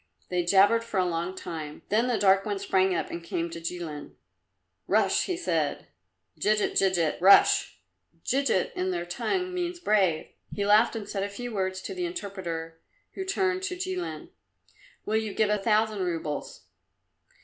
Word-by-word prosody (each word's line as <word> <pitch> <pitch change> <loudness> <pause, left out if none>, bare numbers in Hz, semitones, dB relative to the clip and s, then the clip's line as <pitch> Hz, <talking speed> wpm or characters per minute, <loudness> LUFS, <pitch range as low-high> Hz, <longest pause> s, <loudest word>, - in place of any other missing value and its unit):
They 180 -1 0
jabbered 200 +6 +4
for 225 -4 -2
a 185 - +2
long 175 +1 -2
time, 155 -5 -7
then 225 +4 +2
the 245 -3 +1
dark 195 -1 +4
one 205 -2 -2
sprang 190 -1 +1
up - - -3
and 170 - -6
came 170 0 -3
to 165 - -7
Jilin. 165 -3 -6 0.7
"Russ," - - +2
he 365 - -2
said, 350 - -1 0.5
"djigit, 210 0 +2
djigit 175 -5 +1
Russ!" 195 +2 +6 0.5
(Djigit 270 -8 +1
in 185 +1 -2
their 175 -1 -2
tongue 365 - -2
means 350 -1 -3
brave.) 195 - +1 0.2
He 205 - -2
laughed 215 +3 +4
and 215 -2 -5
said 195 - -3
a 200 - -2
few 240 +3 -6
words 190 -1 -2
to - - -5
the 360 -1 -2
interpreter, 175 - -5 0.3
who 385 - -4
turned 380 -1 0
to 380 -1 -3
Jilin. 365 0 -4 0.8
"Will 220 - +1
you 220 -2 -3
give 215 -1 +2
a 210 - +1
thousand 215 0 +1
roubles?" 165 -4 -4
200 Hz, 165 wpm, -27 LUFS, 175-235 Hz, 0.8 s, Russ